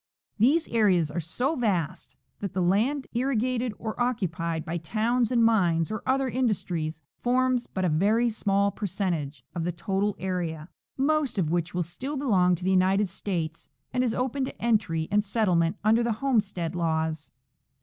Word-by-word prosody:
These 290 +9 +4
areas 185 -9 +3
are 170 - -2
so 245 - -1
vast 195 - -1 0.2
that 200 -3 -4
the 185 - 0
land 230 +11 +1
irrigated 250 0 0
or 220 +2 -5
occupied 170 -9 -1
by 170 +1 -2
towns 225 +7 0
and 235 -2 +3
mines 175 -7 +2
or 215 - -3
other 265 0 +2
industries 180 - -1 0.2
forms 255 0 +1
but 185 -1 -2
a - - +2
very 210 +10 +3
small 200 -2 +1
percentage 170 - -3
of 170 - -3
the 175 - 0
total 195 +4 -1
area, 175 -4 -3 0.3
most 280 -3 +1
of 165 -5 +1
which 170 -1 -1
still 260 - -4
be 275 - -4
longs 180 -6 +3
to 180 - -10
the 190 - +1
United 190 +2 +3
States 170 -4 -4 0.2
and 250 0 +2
is 235 -3 0
open 260 +2 -1
to - - -8
entry 200 -9 +1
and 205 0 +3
settlement 185 -6 +1
under 220 +2 +4
the 235 -1 +1
homestead 210 -9 0
laws. 160 -2 -1
200 Hz, 165 wpm, -27 LUFS, 170-240 Hz, 0.3 s, These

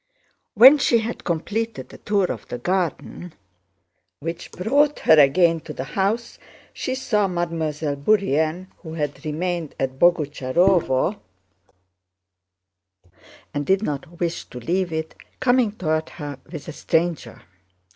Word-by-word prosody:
When 260 +7 +9
she 240 - +3
had 230 +1 -4
completed 210 +7 -3
the - - -13
tour 205 -2 +1
of 115 - -7
the 125 - -5
garden, 175 +2 -3 0.8
which 165 +2 -6
brought 285 - +2
her 160 - +6
again 165 +4 +4
to 155 0 -9
the 130 - -5
house, 215 +5 -1 0.3
she 260 - -3
saw 210 -6 +1
Mademoiselle 160 -4 -2
Bourienne—who 160 0 0
had 145 -3 -4
remained 165 +1 -3
at 130 0 -2
Boguchárovo 165 +1 +2 2.3
and 145 - -1
did 190 +7 +1
not 155 +1 -5
wish 170 -1 -2
to 125 - -10
leave 180 +7 -1
it—coming 225 +9 -1
toward 160 -6 -1
her 145 -4 -7
with 155 -5 -8
a - - -5
stranger. 160 -7 -1
170 Hz, 120 wpm, -22 LUFS, 150-195 Hz, 2.3 s, When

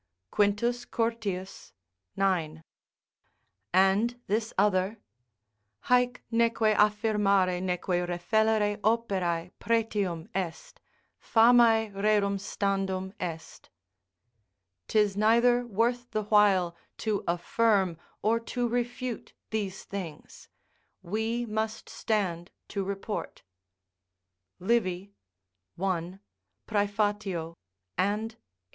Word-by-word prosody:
Quintus 225 +4 +1
Curtius, 215 - -3 0.4
ix.] 170 -5 0 1.1
and 195 +6 +3
this 220 +3 -1
other: 195 +1 +2 0.9
"Haec 245 0 +4
neque 230 -2 +3
affirmare 205 -4 +2
neque 180 -1 -1
refellere 205 +4 +1
operae 195 -6 0
pretium 205 -7 0
est; 180 -4 -5 0.4
famae 225 -1 +5
rerum 200 0 +1
standum 195 -2 -2
est." 165 -2 -6 1.2
["'Tis 210 -2 +2
neither 235 +3 +3
worth 240 +3 0
the 215 - -2
while 200 -5 +3 0.2
to 215 -2 -1
affirm 190 +1 +2 0.3
or 225 +2 +3
to 240 +1 -2
refute 245 0 -3 0.2
these 200 -3 -3
things; 185 -6 -8 0.6
we 220 +5 -1
must 220 0 -3
stand 185 -5 -1 0.2
to 200 -2 -3
report" 200 +2 -5 1.1
Livy, 195 -1 0 0.7
i., 185 -1 -2 0.5
Praef., 205 -5 -1 0.4
and 210 +4 0
viii. 225 - -26
205 Hz, 85 wpm, -28 LUFS, 185-225 Hz, 1.2 s, famae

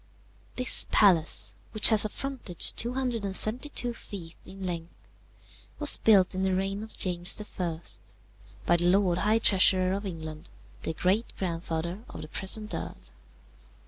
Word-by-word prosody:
This 255 -1 +6
palace, 175 -6 +2 0.2
which 215 - +7
has 220 -2 +6
a 215 - -2
frontage 255 - +1
272 240 +1 -1
feet 175 -7 -9
in 195 0 -9
length, 170 -1 -6 0.8
was - - +5
built 200 -5 +3
in 185 - -4
the 190 -1 0
reign 195 +2 -3
of 220 0 -7
James 175 0 0 0.2
I. 170 -3 -3 0.9
by 175 - +2
the 175 - -1
Lord 180 -1 +1
High 215 +3 +1
Treasurer 185 -3 +3
of 200 +1 -5
England, 160 -2 -9 0.3
the 160 - -4
great 195 +8 -1
grandfather 170 +1 -5
of - - -10
the - - -10
present 210 +6 -1
earl. - - -6
190 Hz, 140 wpm, -26 LUFS, 175-215 Hz, 0.9 s, which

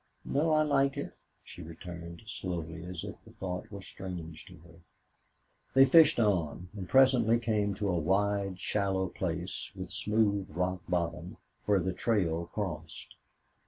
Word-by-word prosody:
"No 150 +4 +1
I 155 0 +4
like 140 -2 +2
it," - - -4 0.3
she - - -11
returned, 85 +2 -9
slowly, 85 -5 -5
as 90 -2 -6
if - - -8
the - - -16
thought 90 -1 -5
were 100 -1 -8
strange 85 -6 -7
to - - -12
her. 85 0 -17 1.0
They 135 0 +9
fished 160 0 +6
on, 90 -5 0
and 95 -3 -6
presently 130 -4 +5
came 105 -4 0
to 105 - -2
a 90 -3 +1
wide, 100 +2 +1
shallow 95 -1 0
place 90 0 -4
with - - -6
smooth 105 -2 +1
rock 90 +2 -1
bottom, 85 0 -2 0.3
where 100 -2 +4
the 90 +1 -1
trail 85 -6 0
crossed. 80 -7 -5
95 Hz, 150 wpm, -31 LUFS, 85-105 Hz, 1.0 s, They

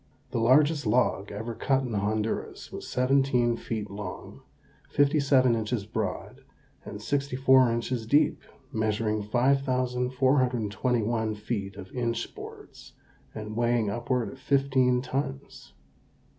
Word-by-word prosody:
The - - -1
largest 145 +4 +4
log 105 -3 +1
ever 110 +3 -5
cut 135 +3 +1
in 125 -3 -4
Honduras 105 +2 -2
was - - -7
seventeen 125 -2 +2
feet 110 -3 -4
long, 100 -2 -8 0.5
fifty 145 +1 +3
seven 130 -3 +4
inches 110 -1 -2
broad, 110 -3 -4 0.4
and 105 - -8
sixty 140 +4 -2
four 130 -2 +5
inches 115 0 -2
deep, 150 +4 +3 0.3
measuring 110 0 0
5,421 125 -2 +1
feet 105 -2 -4
of 95 - -10
inch 120 -2 -2
boards, - - -11 0.4
and 110 0 -6
weighing 120 -2 +1
upward 120 +2 -1
of 135 - -13
fifteen 130 -2 +2
tons. 130 - -5
120 Hz, 115 wpm, -27 LUFS, 110-130 Hz, 0.5 s, four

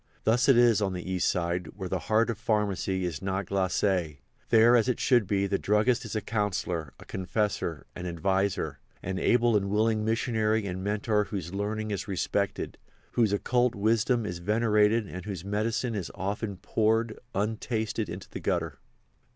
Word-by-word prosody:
Thus 120 +5 +3
it 135 - +7
is 120 -3 +5
on 95 -2 0
the 90 +1 -5
East 90 -1 +1
Side, 90 0 -1
where 95 -2 -5
the 95 0 -1
heart 115 +2 +3
of 110 - -7
pharmacy 100 -4 0
is 80 -5 -4
not 95 0 -2
glacé. 95 -4 0 0.3
There, 115 +1 +6
as 120 +1 +3
it 125 - 0
should 120 -6 +3
be, 100 -1 +1
the 100 0 0
druggist 115 +4 +2
is 110 - -6
a 110 - 0
counsellor, 105 - -2
a - - -12
confessor, 95 -4 -2
an 90 0 -5
adviser, 95 +3 -1 0.2
an 95 +1 -3
able 120 -1 +3
and 100 -1 +1
willing 110 +1 +2
missionary 110 -1 +1
and 95 -1 -4
mentor 105 +1 +1
whose 95 -4 -5
learning 105 +2 -2
is 100 +1 -3
respected, 100 +1 -2 0.3
whose 115 -4 +2
occult 120 +4 +1
wisdom 115 +3 +2
is 90 -3 -4
venerated 105 +2 +2
and 90 -2 -8
whose 95 -4 -5
medicine 110 +4 -1
is 100 -5 -3
often 100 +1 -3
poured, 110 +3 0 0.2
untasted, 110 0 -1
into 90 +3 -7
the - - -7
gutter. - - -2
105 Hz, 170 wpm, -28 LUFS, 95-110 Hz, 0.3 s, it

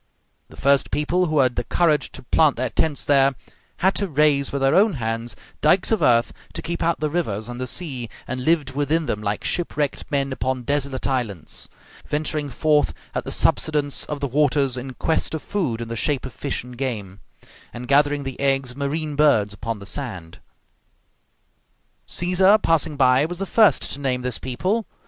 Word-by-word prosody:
The - - -15
first 140 0 +3
people 170 +5 +1
who 155 -1 -1
had 125 -2 +2
the - - 0
courage 160 -4 +1
to - - -10
plant 150 +3 +3
their 125 0 -2
tents 155 -3 0
there, 135 -1 +4 0.5
had 190 - +5
to 200 - 0
raise 145 -3 +2
with 140 -1 -2
their 135 +1 +4
own 200 0 +4
hands 115 -1 -3 0.3
dikes 175 +8 +3
of 220 - +2
earth 120 -1 +3 0.2
to - - -5
keep 170 0 -3
out 170 0 +1
the 155 - 0
rivers 110 - -1
and 120 +1 -6
the 130 - -2
sea, 130 -6 -4 0.2
and 130 0 -4
lived 155 -2 +2
within 145 +4 0
them 105 -6 -2
like 105 0 -2
shipwrecked 150 -5 -2
men 140 -2 0
upon 130 -1 -2
desolate 140 0 -2
islands, 115 - -3 0.4
venturing 150 -1 -2
forth 150 +3 +1 0.2
at - - -3
the - - -4
subsidence 150 -2 +1
of 150 -1 -5
the 140 - 0
waters 140 -1 +2
in 130 0 -6
quest 160 +3 0
of 155 - -6
food 150 - -2
in 115 - -4
the 115 - -4
shape 140 +4 -1
of 130 - -7
fish 135 +7 -3
and 125 -1 -12
game, 105 -8 -4 0.5
and 120 +1 -8
gathering 145 +1 +3
the 135 -1 -6
eggs 135 -2 +1
of 125 - -14
marine 150 +2 -2
birds 125 -9 +3
upon 115 +1 -4
the 100 - -11
sand. 95 - -6 1.7
Caesar, 185 +4 +4
passing 160 -6 0
by, 130 0 +4
was 175 +2 -5
the 195 - -3
first 215 +1 +3
to 140 - -5
name 130 -3 -1
this 125 -2 -2
people. 185 - -1
140 Hz, 190 wpm, -22 LUFS, 125-155 Hz, 1.7 s, had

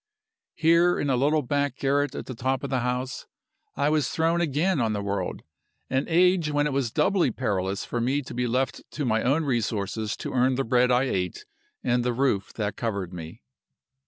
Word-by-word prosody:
"Here, 170 +2 +4
in 145 - 0
a - - +3
little 145 +4 +2
back 140 0 0
garret 140 +1 0
at - - -5
the 130 - -6
top 130 +3 -1
of 140 - -4
the 130 - +1
house, 125 +1 -3 0.5
I 140 +1 +1
was 150 -3 +1
thrown 165 +1 +1
again 165 +1 +1
on 110 -2 +1
the 105 - -2
world 100 -2 -3 0.5
an 130 +1 +1
age 175 -1 +3
when 145 0 +1
it 150 - -1
was 135 -3 0
doubly 180 - +2
perilous 95 -3 -2
for 120 - -2
me 135 +4 0
to - - -9
be 125 0 -1
left 125 0 -1
to 145 - -2
my 110 -2 +1
own 145 +5 +1
resources 110 -4 -1
to - - -5
earn 130 +1 +3
the 135 - 0
bread 125 +1 +3
I 125 +1 +4
ate 90 -9 -2 0.4
and 120 0 +1
the 125 0 0
roof 120 -6 0
that 105 -2 -3
covered 100 -6 -3
me. 85 +5 -9
130 Hz, 200 wpm, -26 LUFS, 115-145 Hz, 0.5 s, Here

